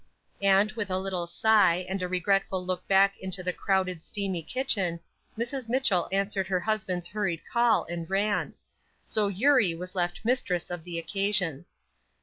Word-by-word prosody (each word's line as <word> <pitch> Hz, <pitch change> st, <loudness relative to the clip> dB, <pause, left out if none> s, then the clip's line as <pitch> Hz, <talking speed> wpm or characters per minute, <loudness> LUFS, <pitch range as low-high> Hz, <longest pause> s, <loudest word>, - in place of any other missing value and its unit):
And 200 Hz, +1 st, +4 dB
with 215 Hz, -2 st, -4 dB
a 185 Hz, -, 0 dB
little 185 Hz, -2 st, -2 dB
sigh, 185 Hz, -1 st, +3 dB
and 190 Hz, 0 st, -3 dB
a 180 Hz, -, -1 dB
regretful 185 Hz, 0 st, 0 dB
look 185 Hz, 0 st, -3 dB
back 195 Hz, 0 st, +4 dB
into 185 Hz, -1 st, -2 dB
the 180 Hz, 0 st, -1 dB
crowded, 185 Hz, -4 st, 0 dB
steamy 195 Hz, -2 st, -3 dB
kitchen, 190 Hz, -, 0 dB, 0.4 s
Mrs. 235 Hz, +1 st, -3 dB
Mitchell 235 Hz, -9 st, +2 dB
answered 195 Hz, 0 st, 0 dB
her 185 Hz, -2 st, 0 dB
husband's 190 Hz, -4 st, -1 dB
hurried 190 Hz, -4 st, -2 dB
call 235 Hz, -2 st, +4 dB
and 170 Hz, -1 st, -6 dB
ran. 200 Hz, +2 st, 0 dB, 0.5 s
So 215 Hz, -2 st, +1 dB
Eurie 205 Hz, -2 st, +3 dB
was 180 Hz, +2 st, -7 dB
left 175 Hz, +1 st, -2 dB
mistress 195 Hz, -9 st, 0 dB
of 175 Hz, -2 st, -6 dB
the 175 Hz, -1 st, -5 dB
occasion. 180 Hz, -3 st, -1 dB
190 Hz, 155 wpm, -28 LUFS, 180-210 Hz, 0.5 s, And